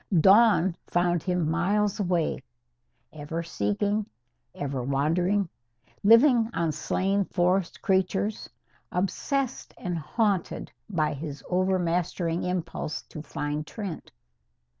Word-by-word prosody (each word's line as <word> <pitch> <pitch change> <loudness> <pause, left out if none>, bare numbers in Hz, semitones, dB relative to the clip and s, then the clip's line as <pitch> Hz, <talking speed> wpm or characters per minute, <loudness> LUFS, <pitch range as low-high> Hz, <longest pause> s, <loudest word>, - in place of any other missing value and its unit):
Dawn 190 -1 +5
found 175 -1 +1
him 180 -3 0
miles 200 +5 +1
away, 175 -4 0 0.7
ever 155 +2 -4
seeking, 200 - -1 0.5
ever 140 -2 -3
wandering, 165 +9 +1 0.6
living 230 +1 +6
on 165 -1 +1
slain 195 +6 0
forest 180 0 0
creatures, 190 +2 0 0.4
obsessed 250 +9 -2
and 175 -4 -3
haunted 195 +4 -1 0.2
by 155 -6 0
his 145 -1 -6
overmastering 180 -2 0
impulse 180 -4 -3
to 155 - -9
find 150 0 -4
Trent. 200 -7 -6
180 Hz, 95 wpm, -27 LUFS, 160-200 Hz, 0.7 s, living